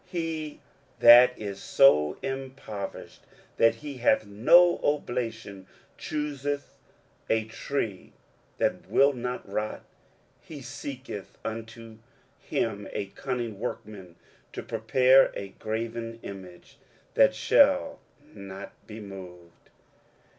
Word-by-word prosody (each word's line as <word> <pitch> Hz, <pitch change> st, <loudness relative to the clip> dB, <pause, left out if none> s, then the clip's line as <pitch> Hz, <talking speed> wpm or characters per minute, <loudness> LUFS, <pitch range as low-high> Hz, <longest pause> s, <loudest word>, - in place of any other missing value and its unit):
23:040:020 -, -, -28 dB
He 165 Hz, -4 st, -4 dB, 0.4 s
that 125 Hz, +2 st, +8 dB
is 100 Hz, -2 st, -6 dB
so 75 Hz, -, +4 dB
impoverished 130 Hz, -7 st, -6 dB, 0.4 s
that 115 Hz, -, +4 dB
he 145 Hz, -3 st, -8 dB
hath 115 Hz, -3 st, +2 dB
no 170 Hz, +13 st, +5 dB
oblation 115 Hz, -9 st, -3 dB, 0.3 s
chooseth 145 Hz, -2 st, -4 dB, 0.5 s
a 110 Hz, 0 st, +2 dB
tree 115 Hz, -3 st, -4 dB, 0.5 s
that -, -, -1 dB
will 140 Hz, +1 st, +4 dB
not 125 Hz, -2 st, -5 dB
rot; 105 Hz, +2 st, -4 dB, 0.6 s
he 150 Hz, -, -10 dB
seeketh 130 Hz, -5 st, -8 dB
unto 115 Hz, 0 st, -7 dB, 0.4 s
him 105 Hz, -3 st, -2 dB
a -, -, -2 dB
cunning 120 Hz, -6 st, -4 dB
workman 100 Hz, -6 st, -7 dB, 0.4 s
to -, -, -6 dB
prepare 125 Hz, +4 st, +4 dB
a 100 Hz, -, -6 dB
graven 115 Hz, +1 st, -4 dB
image, 95 Hz, -3 st, -11 dB, 0.3 s
that -, -, +5 dB
shall 280 Hz, 0 st, +3 dB, 0.3 s
not 100 Hz, -1 st, -9 dB, 0.2 s
be 110 Hz, 0 st, -9 dB
moved. 90 Hz, -4 st, -12 dB
115 Hz, 105 wpm, -27 LUFS, 100-140 Hz, 0.6 s, that